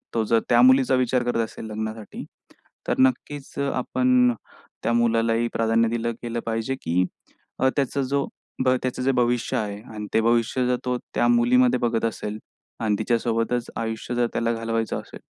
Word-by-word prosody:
तो 115 - +2
जर 115 +1 +3
त्या 120 0 +5
मुलीचा 130 +1 +5
विचार 125 -1 +1
करत 120 -1 -1
असेल 110 - -9
लग्नासाठी, 110 0 -6 0.6
तर - - +1
नक्कीच 135 +2 0
अ, 140 0 0
आपण 125 -1 +3 0.5
त्या 115 - +1
मुलालाही 115 0 +2
प्राधान्य 115 0 +2
दिलं 115 0 -1
गेलं 120 0 -3
पाहिजे 115 +3 -1
की 90 +2 +1 0.6
अ, 130 - +4
त्याचा 140 0 0
जो 140 +1 0 0.4
भ - - +4
त्याचं 130 0 -2
जे 135 - +3
भविष्य 120 0 +1
आहे 105 -3 -3
आणि 105 -1 -5
ते - - +4
भविष्य 120 +2 +2
जर 125 - +2
तो 125 0 0 0.2
त्या 120 - +3
मुलीमध्ये 125 +1 +4
बघत 115 -1 0
असेल 105 -1 -3 0.4
अन 110 -2 +1
तिच्यासोबतच 115 +1 0
आयुष्य 115 +1 -3
जर 120 0 +2
त्याला 115 0 0
घालवायचं 115 0 -2
असेल - - -12
120 Hz, 170 wpm, -24 LUFS, 115-125 Hz, 0.6 s, त्या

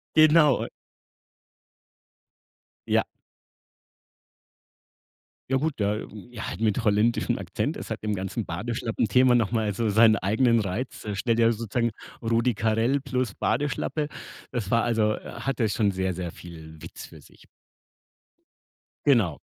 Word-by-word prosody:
Genau, 155 -2 +6
und - - -4 2.2
Ja. - - +3 2.5
Ja 135 - +3
gut, 145 -4 -1
der 105 +1 0 0.2
ja, 115 -3 -6
halt - - -6
mit 110 +2 +1
holländischem 105 +3 +2
Akzent. - - -3
Es - - -8
hat - - -4
im 105 -1 -1
ganzen 95 +3 -3
Badeschlappenthema 115 +5 +1
noch 115 -4 +2
mal 110 -3 0
so 110 +2 -1
seinen 110 +1 +5
eigenen 115 +4 +2
Reiz. 105 +4 -4
Äh, 105 - -3
stell 115 +4 0
dir 115 0 +4
sozusagen 115 +1 -1 0.3
Rudi 115 +2 +2
Carrell 115 +6 +1
plus 130 -6 -2
Badeschlappe. 145 +2 -1 0.4
Das 115 -6 -3
war 115 0 +3
also 110 -2 +1
äh, - - -7 0.2
hatte 135 -4 0
schon 105 -2 +1
sehr, 95 0 -1
sehr 85 -1 -5
viel 80 -2 -12
Witz 85 - -9
für - - -15
sich. - - -20 1.6
Genau. 110 - +3
115 Hz, 130 wpm, -26 LUFS, 100-125 Hz, 2.5 s, Genau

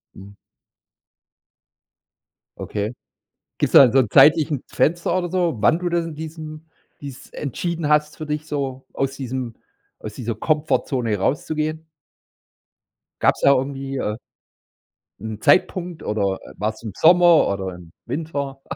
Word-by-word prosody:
Mhm. 100 +1 -12 2.2
Okay. 105 +2 -4 0.7
Gibt's - - 0
da - - +10
'n 120 - +2
so 135 - +4
'n 120 - 0
zeitlichen 150 +1 +5
Fenster 170 +2 0
oder 175 -2 -2
so, 175 -6 0
wann 155 +10 +3
du 180 0 -2
da 170 0 +1
diesem 160 -1 -8 0.3
dies 140 -3 -10
entschieden 165 +3 -3
hast 150 0 +2
für 155 - -7
dich 150 +1 -3
so, 135 -3 -4
aus 135 0 -2
diesem 130 -3 -5 0.4
aus 105 -1 -8
dieser 115 -1 -4
Komfortzone 130 -4 0
rauszugehen? 155 +8 -2 1.4
Gab's - - +2
da 140 - +6
irgendwie, 135 0 -3
äh 105 -3 -2 1.0
'n 110 +1 -6
Zeitpunkt 180 -2 +2
oder, 100 -3 -1
äh, - - -13
war's 110 +2 -3
im 110 - -5
Sommer 175 - +6
oder 95 -2 -3
im 85 -2 -14
Winter? 140 -4 -4
140 Hz, 130 wpm, -21 LUFS, 115-160 Hz, 2.2 s, da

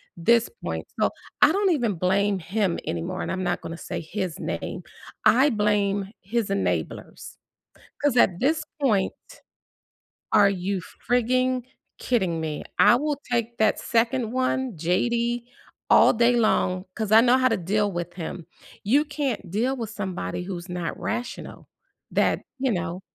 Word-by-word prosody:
this 230 +7 +3
point, - - -4
so - - +3 0.3
I - - +7
don't 390 +1 +2
even 240 -9 +1
blame 195 +3 +1
him 185 +1 -1
anymore, 170 +3 -3
and - - -3
I'm 185 0 -2
not 175 -1 -1
gonna 165 - -6
say - - -5
his 180 0 -4
name; - - -4 0.4
I 265 +5 +6
blame 205 -2 +1
his 225 +2 -1
enablers 90 -4 -3 0.7
'cause 290 -4 +2
at 180 -7 +4
this 315 +4 +2 0.2
point 215 -9 +2 1.2
are 200 -1 +6
you 190 0 -2 0.3
frigging 255 +1 +2 0.4
kidding 185 -9 0
me? 155 -2 -4
I 240 - +7
will 295 +2 -1 0.2
take 235 0 0
that 220 -1 +3
second 235 0 0
one, 255 -2 0
JD, 235 +8 0 0.4
all - - +7
day 240 +1 +3
long 185 -5 +1
'cause 220 -3 -3
I 220 - +9
know 250 +1 +5
how 255 0 +4
to 225 - +1
deal 205 +3 0
with 175 0 -4
him. 170 -1 -6 0.4
You 280 +9 +3
can't 275 - -3
deal 245 +8 0
with 225 -3 -5
somebody 190 -4 -4
who's 180 -1 -6
not 175 -2 -4
rational, 240 0 -5 0.4
that - - +2 0.2
you 260 -1 +1
know, 180 -1 -3
210 Hz, 150 wpm, -25 LUFS, 180-245 Hz, 1.2 s, I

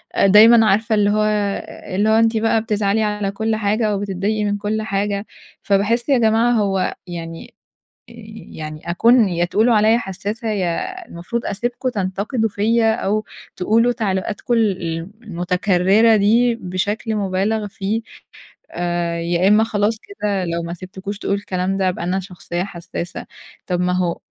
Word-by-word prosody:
أ - - +3
دايمًا 220 +3 +7
عارفة 220 +2 +2
اللي 205 -1 +3
هو 215 +1 +2
أ 205 -3 -2
اللي 205 +3 +2
هو - - +4
أنتِ 225 0 +3
بقى 225 0 +2
بتزعلي 215 -1 0
على 210 -2 -1
كل 220 +2 -1
حاجة 215 +1 0
أو 205 -2 0
بتضايقي 205 +2 -2
من 205 0 0
كل 210 +1 -2
حاجة، 200 -1 -2 0.4
فباحس 210 +6 +1
يا 275 - +5
جماعة 225 +1 +3
هو 200 -5 0
يعني 165 -1 -8 0.6
آآ، - - -14 0.4
يعني 155 0 -7
أكون 230 +4 +4
يا 175 -1 0
تقولوا 220 +7 +2
عليّا 215 +2 +4
حسّاسة، 205 +2 -4
يا 215 - -2
المفروض 205 +8 -5
أسيبكم 240 +5 -2
تنتقدوا 210 +3 -2
فيَّ 225 +3 +1
أو 215 -1 +1 0.3
تقولوا 225 +6 +2
تعليقاتكم 210 +1 -2
ال 215 -5 +1
ال 165 +1 -4
المتكرّرة 190 +3 +2
دي 230 +4 +3
بشكل 205 +2 -3
مُبالغ 205 +2 -1
فيه، 205 +3 -3 0.7
آآ، 175 -1 -2
يا 170 +2 +1
إمّا 210 +2 +5
خلاص 215 0 0
كده 210 - -3
لو 170 0 -2
ما 170 +1 -5
سِبتكوش 190 +3 -7
تقولوا 200 - -1
الكلام 190 -1 -2
ده، 190 -1 +1
أبقى 180 - -4
أنا 180 +2 0
شخصية 180 -1 -5
حسّاسة، 175 -2 -6 0.4
طب 180 -1 -1
ما 180 0 +1
هو 180 -2 0
205 Hz, 160 wpm, -20 LUFS, 185-220 Hz, 0.7 s, دايمًا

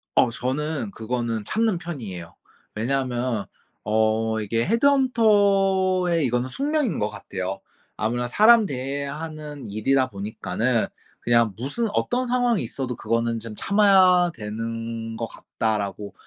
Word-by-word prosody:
어 120 - +5
저는 130 0 -3
그거는 115 -1 -3
참는 215 - 0
편이에요. 105 - -7 0.4
왜냐하면 120 -1 -1 0.4
어 110 +1 +1
이게 115 +2 0
헤드헌터의 200 - +3
이거는 125 0 0
숙명인 280 - -1
거 105 - 0
같아요. 95 -1 -5 0.4
아무나 120 +3 -1
사람 215 - +6
대해야 140 +2 -4
하는 150 -5 -7
일이다 130 +6 +1
보니까는 110 +3 -1 0.3
그냥 115 -3 +2
무슨 145 - -2
어떤 250 +1 0
상황이 245 - +2
있어도 125 +1 -4
그거는 115 0 -1
좀 110 -1 -8
'참아야 190 - +5
되는 115 +1 -5
거 115 - -2
같다.'라고 105 -2 -3
125 Hz, 285 characters per minute, -24 LUFS, 110-185 Hz, 0.4 s, 사람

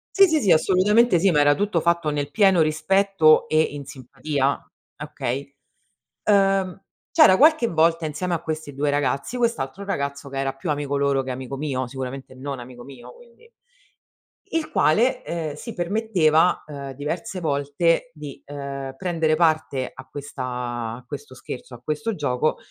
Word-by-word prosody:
Sì, 390 - +8
sì, 315 -3 +1
sì, 195 - +3
assolutamente 195 +5 +4
sì, 195 +3 +3
ma 150 - +3
era 145 0 +5
tutto 200 +1 0
fatto 170 -1 +1
nel 145 -1 -2
pieno 195 -5 +4
rispetto 160 +2 +3
e 155 - +2
in 145 -2 -3
simpatia, 135 +2 -2 0.4
okay. 140 +3 -4 0.8
Uhm, 195 -2 +2 0.3
c'era 310 - +7
qualche 305 -4 +5
volta 165 -2 +2
insieme 155 +4 -3
a 165 - -4
questi 155 -2 -5
2 145 +1 0
ragazzi, 145 - -1
quest'altro 200 - -1
ragazzo 140 -6 -3
che 135 - -6
era 135 0 -1
più 135 +5 -6
amico 145 -1 -1
loro 140 -1 +1
che 130 - -4
amico 130 +1 -6
mio, 135 -3 -2
sicuramente 130 0 -7
non 135 0 -6
amico 120 0 -10
mio 125 -2 -12
quindi 245 - -20 1.0
il 325 -1 -1
quale, 250 +10 +2
ehm, 160 -3 -4
si 230 +9 -8
permetteva, 180 -4 +2
ehm, 140 -2 -7
diverse 165 - -4
volte 155 +2 0
di, 150 -3 -9
ehm, 140 -1 -6
prendere 165 -3 0
parte 155 -5 +1
a - - -12
questa 145 -2 -7 0.5
a 125 - -14
questo 140 -1 -8
scherzo, 130 0 -9
a 120 - -11
questo 155 - -2
gioco, 145 -3 0
155 Hz, 160 wpm, -23 LUFS, 140-185 Hz, 1.0 s, Sì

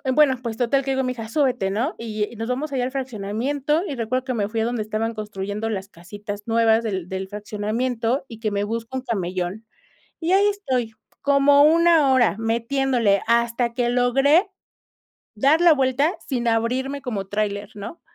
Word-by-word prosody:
me 300 - +7
ento 265 -3 +1
pues 230 -2 -4
total 265 +3 +1
que 270 - -2
le - - 0
digo 265 - +1
a - - -1
mi 255 - -1
hija: 225 -3 -7
"Súbete", 250 -5 +1
¿no? 235 - -1
Y 215 -2 -3
y - - -11
nos 225 +1 -4
vamos 285 +4 -2
ahí 265 -2 -1
al 250 +1 -2
fraccionamiento 265 +4 -2
y 285 - -4
recuerdo 250 +2 -1
que 260 - -2
me 210 -4 -1
fui 225 0 -1
a - - +1
donde 240 -1 -2
estaban 215 +2 -2
construyendo 210 0 -4
las 195 -3 -4
casitas 205 +3 -8
nuevas 225 0 +3
del 190 -5 -3
del 190 0 -4
fraccionamiento 225 +5 -2
y 225 -4 -11
que 220 -2 -2
me 200 0 -1
busco 230 +4 -4
un 260 - -5
camellón. 190 -2 -3 0.5
Y 330 +1 -1
ahí 400 +2 +5
estoy, 260 - -1 0.3
como 280 0 +5
una 325 -2 +5
hora 245 -5 +3
metiéndole 230 -2 +1
hasta 235 0 +1
que 240 0 0
logré 270 - +3 0.9
dar 280 +9 +3
la 345 -1 +7
vuelta 275 +5 +1
sin 240 -4 -1
abrirme 250 +5 0
como 215 -7 -4
tráiler 205 0 -2
¿no? 210 +11 -8
235 Hz, 190 wpm, -23 LUFS, 215-270 Hz, 0.9 s, me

